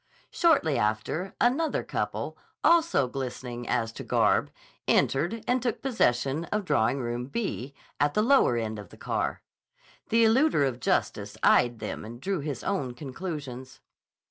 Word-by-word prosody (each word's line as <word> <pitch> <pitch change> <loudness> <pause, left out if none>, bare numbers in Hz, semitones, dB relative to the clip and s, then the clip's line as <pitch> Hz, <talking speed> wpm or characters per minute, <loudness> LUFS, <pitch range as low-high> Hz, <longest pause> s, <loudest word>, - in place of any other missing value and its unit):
Shortly 220 - +3
after, 110 - -1
another 280 +7 +2
couple, - - -3 0.3
also 330 - +4
glistening 125 -2 -5
as 115 -1 0
to - - -8
garb, - - +2 0.4
entered 175 +11 +1
and 250 0 +2
took 240 -2 -1
possession 150 - +1
of 210 +1 -2
Drawing 140 -4 +2
Room 120 +1 -3
"B," 140 - -4 0.2
at 145 0 +2
the 210 - +3
lower 245 - +4
end 110 -2 -3
of 105 - -10
the - - -15
car. - - -2 0.7
The 230 +1 +4
eluder 225 - +4
of 125 -2 -4
justice - - -1
eyed 120 -1 +4
them 105 -1 -5
and 115 +2 -9
drew 190 +5 -2
his 140 -4 -4
own 140 -11 -2
conclusions. 130 -2 -7
140 Hz, 145 wpm, -27 LUFS, -, 0.7 s, also